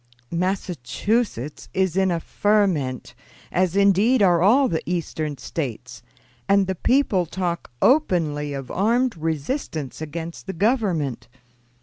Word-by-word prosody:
"Massachusetts 180 - -2
is 190 -2 +1
in 190 0 +3
a 170 -2 0
ferment, 180 -11 0 0.4
as 185 0 +1
indeed 200 +4 +4
are 175 -3 +4
all 250 +9 +5
the 165 -6 -1
Eastern 155 -4 -3
States, 130 -3 -5 0.5
and 200 0 +4
the 190 - -1
people 195 -3 +2
talk 175 0 -3
openly 165 - +2
of 135 -2 -6
armed 235 +5 +1
resistance 160 - -3
against 165 +4 -6
the 190 - -3
Government. 175 - 0
180 Hz, 115 wpm, -23 LUFS, 155-200 Hz, 0.5 s, all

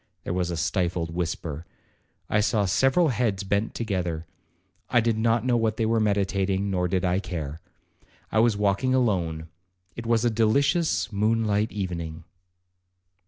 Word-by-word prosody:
There - - -3
was 90 -1 -1
a 85 - -3
stifled 85 0 -1
whisper. 85 -3 -3 0.6
I 105 - +1
saw 105 -1 +2
several 135 - +3
heads 110 -5 0
bent 100 +3 -1
together. 90 -7 -2 0.6
I 120 - +4
did 115 -1 +1
not 115 +1 +1
know 125 -1 +2
what 110 -1 0
they 115 - +1
were 115 +1 +2
meditating, 100 -1 0
nor 90 -1 +1
did 95 +1 0
I 90 +1 +1
care. 80 -5 -5 0.7
I 110 - +2
was 115 -2 +3
walking 105 +6 +1
alone,—it 90 -1 -3
was 115 0 +2
a 120 - +3
delicious 115 - +2
moon 110 +3 +1
light 105 +1 +1
evening. 85 -5 -4
100 Hz, 150 wpm, -25 LUFS, 90-115 Hz, 0.7 s, I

